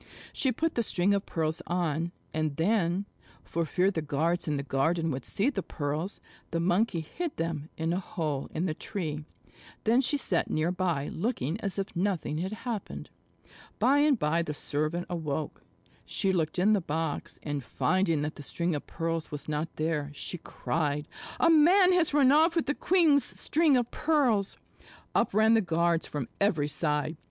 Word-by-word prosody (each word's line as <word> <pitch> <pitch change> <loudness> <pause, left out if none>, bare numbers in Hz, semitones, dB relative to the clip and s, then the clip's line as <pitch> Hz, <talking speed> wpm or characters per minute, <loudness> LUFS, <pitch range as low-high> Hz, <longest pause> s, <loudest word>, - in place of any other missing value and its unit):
She 265 - +2
put 325 +7 -1
the 235 - +1
string 195 -2 +1
of 200 0 -1
pearls 160 -1 -1
on, 170 -1 -1 0.2
and 155 -2 -1
then, 180 +2 +1 0.4
for 165 -1 -2
fear 185 +5 +2
the 165 - -2
guards 160 +4 0
in 150 -1 0
the 140 - -2
garden 160 +5 +1
would 130 -1 -4
see 230 +8 +1
the 200 - -2
pearls, 155 +4 -3 0.3
the 165 - -1
Monkey 180 +1 +1
hid 330 - -5
them 165 -2 -3
in 165 +1 0
a 180 - 0
hole 155 -7 -3
in 165 +3 -1
the 165 - 0
tree. 155 -5 -4 0.6
Then 235 +4 +4
she 290 +3 +1
sat 185 -10 0
near 155 +3 +1
by 175 -6 -1
looking 180 - -2
as 195 -1 -3
if 195 -1 -3
nothing 175 -4 -1
had 185 +3 -2
happened. 230 -5 -5 0.7
By 280 +3 +4
and 290 -2 +4
by 165 -1 +1
the 150 -3 -4
servant 155 +5 -2
awoke. 160 -3 -3 0.4
She 195 -3 0
looked 165 -3 0
in 200 +4 +4
the 205 - +2
box, 160 -1 -3
and 145 -3 -3
finding 165 +2 +1
that 150 +1 -2
the - - -7
string 170 +4 -2
of 145 - -4
pearls 165 -1 -3
was 150 -1 -6
not 155 +1 -3
there, 155 -2 -1
she 180 - -2
cried, 150 -2 -2 0.3
"A 330 - +5
man 360 +4 +6
has 350 -3 +3
run 280 -3 +5
off 320 +3 +5
with 330 - +1
the 290 - 0
queen's 320 -5 +4
string 310 -4 +2
of 240 -1 -1
pearls." 255 -11 +1 0.6
Up - - +2
ran 220 +2 +4
the 225 - +5
guards 170 -2 +1
from 145 -5 -4
every 165 -8 +2
side. 150 +1 -1
170 Hz, 180 wpm, -29 LUFS, 155-215 Hz, 0.7 s, man